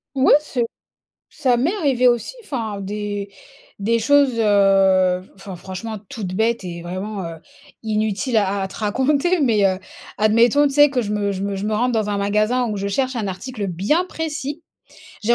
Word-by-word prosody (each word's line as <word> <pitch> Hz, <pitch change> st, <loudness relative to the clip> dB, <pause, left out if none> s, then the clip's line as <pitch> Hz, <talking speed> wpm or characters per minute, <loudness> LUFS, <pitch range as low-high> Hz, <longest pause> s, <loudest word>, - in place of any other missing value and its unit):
Oui 270 Hz, 0 st, +5 dB
c'est 270 Hz, -5 st, -2 dB, 0.7 s
ça 255 Hz, -5 st, +1 dB
m'est 310 Hz, -, +1 dB
arrivé 270 Hz, -, +2 dB
aussi, 240 Hz, -, 0 dB
enfin 225 Hz, -, -4 dB
des 205 Hz, 0 st, -4 dB, 0.5 s
des 230 Hz, +3 st, +1 dB
choses, 270 Hz, +1 st, +3 dB
heu, 195 Hz, -3 st, +4 dB
enfin 195 Hz, -1 st, -9 dB
franchement, 195 Hz, +5 st, -6 dB
toutes 195 Hz, -5 st, -5 dB
bêtes 225 Hz, +1 st, 0 dB
et 170 Hz, -1 st, -6 dB
vraiment, 190 Hz, +4 st, -5 dB
heu, 165 Hz, -1 st, -6 dB, 0.5 s
inutiles 220 Hz, +2 st, -1 dB
à 200 Hz, -1 st, 0 dB
à 190 Hz, -, -3 dB
te 190 Hz, -, -11 dB
raconter. 275 Hz, -, +1 dB
Mais, 225 Hz, -7 st, +2 dB
heu, 190 Hz, -1 st, 0 dB, 0.4 s
admettons, 230 Hz, +7 st, +4 dB
tu 280 Hz, -, -1 dB
sais 290 Hz, 0 st, +7 dB
que 255 Hz, -3 st, 0 dB
je 210 Hz, -1 st, -3 dB
me 205 Hz, -1 st, 0 dB
je 190 Hz, 0 st, -4 dB
me 200 Hz, 0 st, -2 dB
je 195 Hz, +2 st, -3 dB
me 215 Hz, -, 0 dB
rende 245 Hz, +4 st, +1 dB
dans 220 Hz, -2 st, 0 dB
un 205 Hz, -, -1 dB
magasin 215 Hz, +5 st, +1 dB
où 210 Hz, -, -3 dB
je 200 Hz, -, -3 dB
cherche 260 Hz, +6 st, -1 dB
un 220 Hz, -3 st, -2 dB
article 205 Hz, +3 st, -5 dB
bien 200 Hz, -, +1 dB
précis. 310 Hz, -3 st, -4 dB, 0.6 s
J'ai 235 Hz, +3 st, +3 dB
215 Hz, 185 wpm, -21 LUFS, 200-255 Hz, 0.7 s, sais